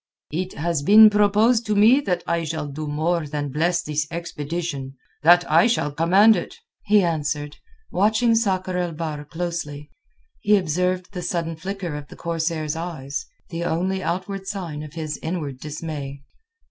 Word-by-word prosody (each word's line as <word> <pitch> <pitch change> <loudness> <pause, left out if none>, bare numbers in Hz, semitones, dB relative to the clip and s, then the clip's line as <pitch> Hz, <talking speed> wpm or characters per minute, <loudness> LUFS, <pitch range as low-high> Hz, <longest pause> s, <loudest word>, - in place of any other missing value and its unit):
"It 180 +4 -3
has 165 0 -1
been 210 +7 +8
proposed 210 +3 +3
to 210 - +1
me 220 +7 +6
that 180 -10 -1
I 170 0 0
shall 160 -1 -3
do 150 +2 -6
more 155 +2 0
than 145 -1 -3
bless 170 +4 +1
this 150 0 -2
expedition—that 165 0 0
I 235 - +6
shall 225 -11 0
command 190 +9 +5
it," 175 - -5 0.3
he 210 -1 +5
answered, 150 -3 -2 0.3
watching 220 +4 +3
Sakr 190 -5 0
el 175 -2 -1
Bahr 155 -2 -4
closely. 150 -2 -5 0.5
He 210 0 +4
observed 180 +2 -1
the 180 - -4
sudden 170 -1 -2
flicker 185 0 -5
of 150 -1 -7
the - - -12
corsair's 165 -2 -2
eyes, 160 -5 -5 0.2
the 170 0 -3
only 185 +3 -1
outward 190 +2 -3
sign 175 -7 -4
of 150 -1 -9
his 155 -2 -4
inward 155 -6 -4
dismay. 145 -2 -6
170 Hz, 155 wpm, -23 LUFS, 150-185 Hz, 0.5 s, been